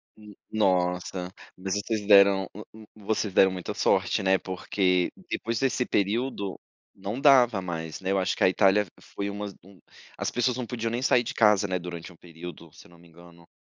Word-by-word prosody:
Hum, 105 -1 -14 0.2
nossa, 90 -3 0 0.2
mas 95 +1 -4
vocês 105 +1 -2
deram 100 -2 +6
um 105 - -8 0.3
um 105 -2 -16
vocês 105 -2 -1
deram 95 0 +5
muita 90 -2 -5
sorte, - - +1
né, 95 0 +4
porque 90 -1 0 0.2
depois 115 -1 -2
desse 130 -2 0
período 100 -1 -1 0.4
não 100 +6 -5
dava 125 -7 +5
mais, 80 -3 -5
né. 95 0 -2
Eu 100 - +2
acho 95 - 0
que - - -1
a - - +6
Itália 100 +2 +3
foi 100 0 -6
umas 100 -1 -6 0.6
as - - -2
pessoas 125 +1 0
não 125 - -3
podiam 115 -1 -3
nem 120 +2 -2
sair 125 -2 +3
de 125 +2 -5
casa, 105 -2 +4
né, 95 -1 -1
durante 85 0 -8
um - - -16
período, 85 -1 -11
se - - -16
eu - - -22
não 85 - -18
me 85 +1 -19
engano. 85 0 -18
100 Hz, 195 wpm, -26 LUFS, 90-110 Hz, 0.6 s, deram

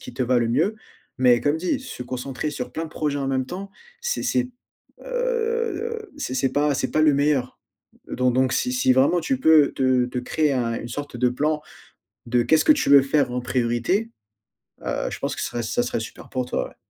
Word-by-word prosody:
qui - - -10
te - - -1
va 125 0 +2
le 115 -1 0
mieux 165 - +1 0.4
mais 125 -2 +5
comme 145 +2 +2
dit: 185 - -1
«Se 255 - -7
concentrer 130 +3 -4
sur 125 -4 -6
plein 160 - -3
de - - -7
projets 150 -2 -2
en 135 - -2
même 130 -1 0
temps, 190 +8 -7 0.3
c'est 485 +1 -2
c'est, 255 0 0 0.6
heu, 465 -3 -2
c'est 290 - -4
c'est 130 0 0
pas 145 +1 +2
c'est 130 0 -2
pas 155 - +2
le 155 -2 +5
meilleur», 140 -3 +1 0.5
donc 125 -1 +1
donc 130 +1 +2
si 255 +1 0
si 250 - +3
vraiment 140 +7 +3
tu 265 +10 -1
peux 160 - +5
te 130 -2 +2
te 125 - -6
créer 150 +4 0
un 120 -3 0
une 120 - -6
sorte 145 +2 -6
de 125 0 +3
plan 150 +4 -1 0.6
de 120 0 +2
qu'est-ce 160 +6 +3
que - - +7
tu 295 - -1
veux 140 -1 +9
faire 135 -2 +1
en 125 - -1
priorité, 125 - 0 0.8
heu, - - -2
je - - -6
pense - - -2
que - - -5
serait 120 - -3
ça 115 +2 0
serait 120 - -2
super 110 - -9
pour 130 -1 -2
toi, 125 - -2
ouais. - - -18
140 Hz, 215 wpm, -23 LUFS, 125-180 Hz, 0.8 s, veux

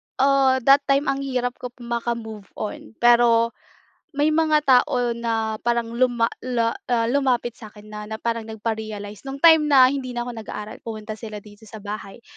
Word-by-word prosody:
ah, 270 -1 +3
that 275 +3 +7
time, 275 +1 +2
ang 275 - -3
hirap 255 -3 -2
ko 250 - -5
po 245 0 -15
maka-move 235 -3 -4
on, 215 +1 -7
pero 235 -1 +5 0.6
may 295 +2 +2
mga 310 -1 +2
tao 250 -2 +3
na 225 -2 -2
parang 235 -1 -1
luma 240 -1 +1
la 235 -2 0 0.2
ah, 235 -2 +2
lumapit 255 -4 +1
sa 215 - -10
akin 210 0 -16
na 210 - -6
na 220 - -4
parang 230 +1 -2
nagpa-realize. 215 -2 -5
'Nung 270 - -5
time 320 0 +6
na 265 -3 +7
hindi 255 -3 -5
na 240 - -1
ko 245 - -6
nag-aaral, 215 -2 -8
pumunta 215 -1 -7
sila 215 -2 -8
dito 210 0 -16
sa 220 - -10
bahay, 205 +1 -7
235 Hz, 180 wpm, -23 LUFS, 220-255 Hz, 0.6 s, that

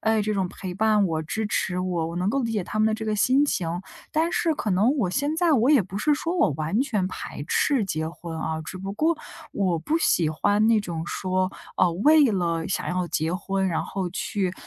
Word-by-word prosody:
哎， 220 -1 +2
这 215 +1 -1
种 190 -2 0
陪 185 -1 -7
伴 210 -1 +3
我、 160 -2 -1
支 215 +7 -3
持 180 -3 -1
我。 180 -3 -1
我 170 - -6
能 180 +2 0
够 275 +3 0
理 230 - -2
解 210 -5 -1
他 215 - -4
们 215 - +4
的 220 - +2
这 220 0 -5
个 215 -1 0
心 260 +7 +3
情， 175 - -1 0.4
但 325 +2 +1
是 330 - +1
可 215 - -3
能 215 +10 +3
我 195 -9 0
现 290 +8 -1
在 340 -1 +3
我 255 0 +4
也 285 -6 +6
不 190 +2 -8
是 300 +7 +2
说 335 +4 -2
我 155 - +3
完 155 - -1
全 215 -9 0
排 165 -5 -6
斥 265 +2 +2
结 160 -4 -2
婚 170 -1 -8
啊， 160 0 -2
只 185 - -7
不 195 +1 -5
过 320 +6 +1 0.4
我 185 -4 0
不 300 - -1
喜 170 - +2
欢 205 +7 +2
那 225 -1 +4
种 170 -5 -4
说， 185 +1 -1 0.3
呃， 175 - +3
为 295 - +5
了 170 -3 -1
想 - - -2
要 180 0 -1
结 160 +2 -1
婚， 190 +1 -1
然 165 - -1
后 190 -2 -3
去， 190 0 -2
195 Hz, 250 characters per minute, -25 LUFS, 175-230 Hz, 0.4 s, 也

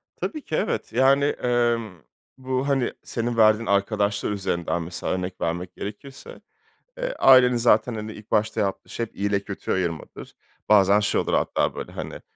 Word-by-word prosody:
Tabii 310 - -4
ki, 155 - -4
evet. 110 - -2
Yani, 135 +3 +4
emm, 120 -7 0 0.4
bu, 130 +1 -2
hani, 135 -3 0
senin 120 0 -3
verdiğin 110 +1 +4
arkadaşlar 100 0 0
üzerinden 85 -4 -2
mesela 85 +2 -4
örnek 90 0 -4
vermek 85 +2 -3
gerekirse, 120 +7 -9 0.6
eee, - - -3
ailenin 125 -2 +7
zaten, 115 0 +3
hani, 110 0 -5
ilk 105 0 -14
başta 110 +1 +1
yaptığı 95 -1 -3
şey 115 - -3
iyiyle 100 0 0
kötüyü 100 0 -4
ayırmadır. 85 -4 -5 0.3
Bazen 100 -1 +5
şey 105 - +1
olur - - -3
hatta - - 0
böyle - - -6
hani, - - -7
110 Hz, 155 wpm, -24 LUFS, 100-125 Hz, 0.6 s, ailenin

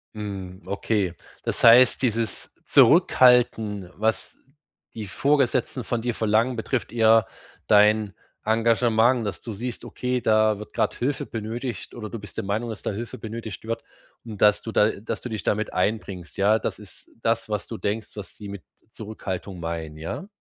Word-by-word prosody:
Mhm, 100 -3 -6
okay. 100 -2 -1 0.3
Das - - -3
heißt, 120 +2 +7
dieses 115 -4 -1
Zurückhalten, 110 -6 +4
was 110 +2 -1 0.6
die 110 -2 -6
Vorgesetzten 130 +1 +1
von 120 0 -2
dir 120 0 0
verlangen, 110 +3 +1
betrifft 120 +2 -2
eher 115 -2 +5 0.4
dein 105 -1 +4 0.3
Engagement, 115 +1 +3
dass 100 - -4
du 115 - -6
siehst, 120 +4 -5
okay, 125 +2 -2
da 110 -2 +3
wird 105 - -10
gerade - - 0
Hilfe 135 +3 -1
benötigt 115 +3 -5
oder 110 -3 -6
du 115 - -5
bist 100 -5 -11
der 115 - -2
Meinung, 105 +4 -2
dass 110 -3 -7
da - - -1
Hilfe 115 +4 -6
benötigt 110 -2 -7
wird. 115 0 -3 0.4
Und 110 -4 -9
dass 105 0 +5
du 115 - -6
da 105 - +4
äh, 100 - -7
dass 110 - -4
du 125 - -6
dich 110 -5 -4
da - - +2
mit 110 +1 -4
einbringst. 95 -2 -2
Ja, 105 +3 +3
das - - -3
ist - - -15
das, 115 0 0
was 105 -1 -3
du 115 - -6
denkst, 105 +1 -3
was 105 -2 -9
sie 105 -2 -8
mit 100 -4 -8 0.3
Zurückhaltung 100 -4 -6
meinen. 80 -2 -5
Ja? 80 - -6
110 Hz, 175 wpm, -24 LUFS, 105-115 Hz, 0.6 s, heißt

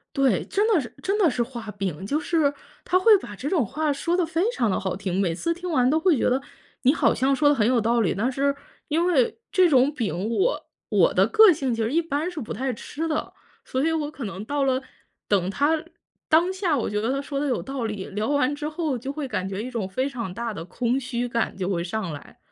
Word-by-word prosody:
对， 265 -8 +2
真 410 +2 +1
的 430 -7 +4
是 245 - -9
真 395 +2 0
的 385 -6 +4
是 245 - -1
画 235 -3 -7
饼。 190 -3 -4
就 290 +9 0
是 315 -4 +1 0.3
他 370 - +2
会 425 +2 +7
把 205 - -9
这 275 +8 -4
种 330 -10 +2
话 305 +8 -1
说 335 +5 -1
得 360 - +2
非 325 +1 -1
常 235 - 0
地 - - 0
好 190 -2 -2
听， 190 -1 -2
每 175 -4 +1
次 335 - -1
听 355 +1 -6
完 255 -5 +3
都 315 +3 +3
会 330 -3 +3
觉 - - +2
得， 255 +2 +1 0.4
你 265 - +5
好 - - +3
像 270 +2 +2
说 290 +1 +3
得 290 - +5
很 220 -4 +2
有 250 -1 +3
道 230 +2 +2
理， 195 - +1
但 230 +7 0
是 280 +2 0 0.3
因 325 +3 +2
为 450 +5 +2
这 370 -4 +5
种 270 +1 +4
饼 215 -6 -2
我 390 - 0 0.2
我 - - +3
的 - - +4
个 440 -2 +7
性 265 -5 -1
其 230 - -2
实 225 +1 0
一 335 - +3
般 315 +1 -2
是 355 -4 -6
不 225 - -7
太 260 +3 -2
吃 315 +8 -5
的。 310 - -2 0.3
所 260 - -2
以 325 - +2
我 305 -2 -1
可 280 - -8
能 195 -1 -5
到 285 +5 -1
了， 260 -1 +1 0.5
等 190 -3 +2
他 295 +8 +1 0.5
当 335 +4 +4
下 375 -6 0
我 235 - -1
觉 210 0 -1
得 230 +4 0
他 275 +1 -1
说 280 -1 -4
得 290 - -1
有 250 - 0
道 270 -3 -4
理， 210 -3 -4
聊 210 +5 -3
完 285 -1 +2
之 295 +1 -4
后 310 -4 -2
就 265 +4 -5
会 295 -2 -4
感 190 -7 -2
觉 195 +2 -4
一 255 - -5
种 220 -6 -2
非 260 +9 -1
常 235 -9 -5
大 230 +1 -4
的 165 -5 -7
空 240 +8 -1
虚 245 -1 -3
感 235 -1 -1
就 190 0 -3
会 175 -3 0
上 185 -1 -3
来。 145 - -10
265 Hz, 275 characters per minute, -24 LUFS, 220-315 Hz, 0.5 s, 会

